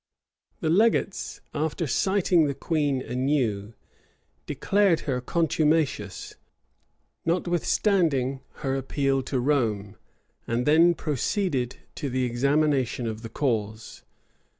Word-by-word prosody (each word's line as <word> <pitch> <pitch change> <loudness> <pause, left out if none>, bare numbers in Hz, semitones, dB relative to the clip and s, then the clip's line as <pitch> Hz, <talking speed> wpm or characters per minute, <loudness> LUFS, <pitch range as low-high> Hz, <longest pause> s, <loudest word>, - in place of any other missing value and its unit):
The 155 - 0
legates, 210 +1 +1
after 160 +3 -1
citing 175 - +2
the 140 - -2
queen 145 -5 0
anew, 125 -5 -1 0.7
declared 200 -5 +2
her 125 -3 -2
contumacious, 155 - 0 0.9
notwithstanding 170 -5 +1 0.2
her 135 0 0
appeal 135 0 0
to 130 0 -2
Rome; 110 -7 0 0.5
and 120 +2 -1
then 165 +3 +5
proceeded 145 - -1 0.2
to 145 - -4
the 130 0 -1
examination 130 0 +1
of 110 -1 -4
the 115 - -7
cause. 110 -4 -2
140 Hz, 100 wpm, -26 LUFS, 125-165 Hz, 0.9 s, then